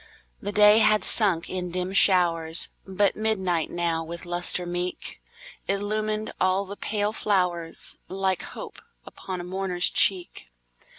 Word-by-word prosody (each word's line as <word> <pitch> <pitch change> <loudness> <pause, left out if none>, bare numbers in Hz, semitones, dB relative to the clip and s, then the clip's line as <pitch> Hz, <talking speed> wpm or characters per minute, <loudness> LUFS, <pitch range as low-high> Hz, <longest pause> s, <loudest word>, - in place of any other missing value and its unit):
The 205 - -4
day 210 +1 +6
had 215 -1 +4
sunk 190 -7 +4
in 180 -1 -4
dim 180 +2 -3
showers, 170 -4 +2 0.2
But 190 +1 +1
midnight 190 -7 0
now, 170 -1 -1
with 170 +2 -8
lustre 175 +1 -1
meek, 175 +1 -4 0.5
Illumined 215 +2 -2
all 185 +2 +2
the 200 +1 -8
pale 210 0 -2
flowers, 180 -6 -1
Like 190 -1 -1
hope - - -9 0.2
upon 185 -1 -7
a - - -5
mourner's 180 -1 -1
cheek. 185 - -1
185 Hz, 130 wpm, -25 LUFS, 175-205 Hz, 0.5 s, day